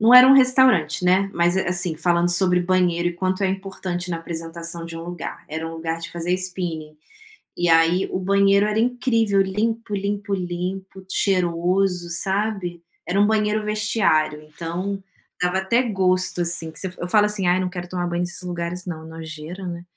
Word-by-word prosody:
não 230 +3 +6
era 250 +1 +11
um 265 - +8
restaurante, 255 - +4
né, 190 +2 +3
mas, 175 +1 +2
eh, 190 - -1
assim 175 -1 +2
falando 175 +1 +2
sobre 180 0 +3
banheiro 175 -1 +1
e - - -4
quanto 185 +2 -2
é - - +3
importante 190 -2 -4
na 170 - -1
apresentação 165 0 -5
de 165 0 -7
um 165 - -7
lugar, 175 -1 -7
era 160 +1 -4
um - - -8
lugar 165 0 -4
de 170 - -7
fazer 175 +1 -3
spinning. 175 -4 -3 0.6
E 175 0 +1
aí, 165 +3 +4
o - - -1
banheiro 200 +1 +3
era 210 +1 0
incrível, 230 -4 +2
limpo 215 +3 -2
limpo 200 0 -3
limpo, 185 +1 -4
cheiroso, 180 -1 +1
sabe? 190 -1 -1 0.3
Era 190 +3 0
um 205 - +5
banheiro 215 0 +1
vestiário 205 -8 +1
então, 170 +6 -5 0.4
dava 180 +1 +1
até 235 +7 +1
gosto, 185 -4 0
assim, 170 -1 0
que - - -8
você 190 - -3
eu 175 - -4
falo 210 +2 +4
assim: 210 -3 -1
"Ai, 180 +1 +3
não 185 - -1
quero 180 -1 -7
tomar 175 -1 -2
banho 175 0 -2
nesses 175 0 -3
lugares 175 0 -4
não, 160 -3 -6
nojeira 160 +3 -8
né." 170 0 -6
180 Hz, 185 wpm, -22 LUFS, 170-195 Hz, 0.6 s, era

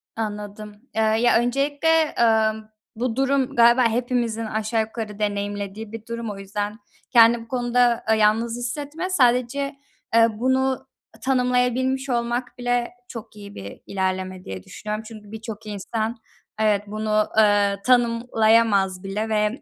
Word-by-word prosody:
Anladım. 210 -1 -5 0.2
Iıı, 220 0 +2
ya 240 0 +4
öncelikle, 290 +6 +1
ımm, 220 -1 +2 0.3
bu 240 0 -2
durum 270 -1 +1
galiba 235 +2 +6
hepimizin 235 -1 -1
aşağı 220 +1 -1
yukarı 220 -1 -6
deneyimlediği 205 0 -3
bir 225 -1 -8
durum. 235 -1 -5
O 200 - -8
yüzden 205 +2 -4 0.3
kendini 235 0 +6
bu - - -18
konuda, 245 -1 +1
ııı, 220 - +4
yalnız 225 +2 +2
hissetme. 290 +8 -4
Sadece, 255 -2 +1 0.4
ııı, 230 -2 +4
bunu 260 +1 +1 0.3
tanımlayabilmiş 255 +1 +1
olmak 240 +1 -2
bile 245 -1 -1 0.2
çok 230 -3 -9
iyi 200 -1 -11
bir 100 0 -9
ilerleme 185 -1 -3
diye 95 -1 -7
düşünüyorum. 215 - -6
Çünkü 215 -2 -12
birçok 220 -1 -8
insan, 220 +3 -3 0.4
evet, 210 -2 +2
bunu, 215 0 0
ııı, 205 -2 +3
tanımlayamaz 230 -5 +3
bile 210 +3 -3
ve, 215 +3 0
225 Hz, 130 wpm, -23 LUFS, 210-245 Hz, 0.4 s, galiba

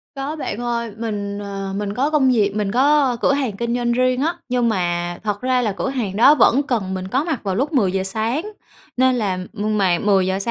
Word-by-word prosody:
Có 275 +3 -4
bạn 225 -8 -4
ơi, 235 -2 -2
mình, 205 -3 -4
ờ, 195 -1 -5
mình 205 -1 -3
có 275 +6 0
công 275 -4 +3
việc, 205 -4 +2
mình 205 -2 -1
có 270 0 +3
cửa 275 - +3
hàng 255 -8 -2
kinh 235 0 -1
doanh 240 -1 0
riêng 255 +1 +1
á, 335 +3 0
nhưng 245 -2 +1
mà 175 -3 -1
thật 210 0 -2
ra 255 0 +1
là 215 -4 0
cửa 200 - -3
hàng 225 -8 -3
đó 275 +7 +6
vẫn 280 0 +4
cần 215 -9 -2
mình 185 0 -4
có 265 +8 0
mặt 320 -7 -2
vào 190 -2 -1
lúc 285 +7 -1
10:00 190 -6 +1
sáng 220 +9 -1 0.6
nên 260 0 +3
là 200 -6 -1 0.2
mà 205 -4 +1
10:00 190 -2 +2
230 Hz, 215 wpm, -20 LUFS, 200-260 Hz, 0.6 s, đó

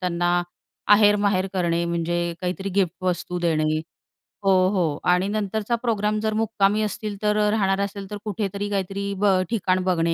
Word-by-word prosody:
त्यांना 175 -1 -1 0.7
आहेर-माहेर 205 -2 +3
करणे 170 -2 0
म्हणजे 170 0 -1 0.2
काहीतरी 185 +2 -3
गिफ्ट 190 -4 +2
वस्तू 180 0 -1
देणे. 155 -2 +1 0.7
हो, 195 - +5 0.2
हो 170 -7 0
आणि 180 +2 +2
नंतरचा 215 +2 -1
प्रोग्राम 215 -2 0
जर 220 0 0
मुक्कामी 215 -1 +1
असतील 210 0 -4
तर 210 0 +2 0.2
राहणार 195 -3 +1
असेल 200 -1 -4
तर 210 - -3
अ, - - -7
कुठेतरी 205 -1 -3
काहीतरी 200 0 -2
ब 195 -2 +3
ठिकाण 185 -4 +1
बघणे 170 -2 +1
195 Hz, 155 wpm, -23 LUFS, 180-205 Hz, 0.7 s, हो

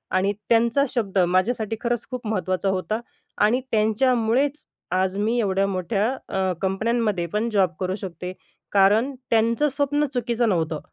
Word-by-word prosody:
आणि 195 +2 +2 0.2
त्यांचा 235 +4 +3
शब्द 200 -6 -1
माझ्यासाठी 215 +5 0
खरंच 240 -1 -1
खूप 245 -3 -5
महत्त्वाचा 185 -2 -1
होता 190 +4 -1 0.5
आणि 245 +5 +2
त्यांच्यामुळेच 240 +5 +1 0.3
आज 185 0 +1
मी 220 +4 +1
एवढ्या 195 -3 +1
मोठ्या 195 +2 -1 0.2
अ, 190 -1 0
कंपन्यांमध्ये 210 -1 0
पण 220 +3 0
जॉब 195 -4 +3
करू 185 +1 -1
शकते. 180 -3 -6 0.4
कारण 210 +7 +4 0.2
त्यांचं 230 +6 +3
स्वप्न 290 +2 0
चुकीचं 240 -2 0
नव्हतं. 160 -4 0
215 Hz, 135 wpm, -23 LUFS, 190-235 Hz, 0.5 s, कारण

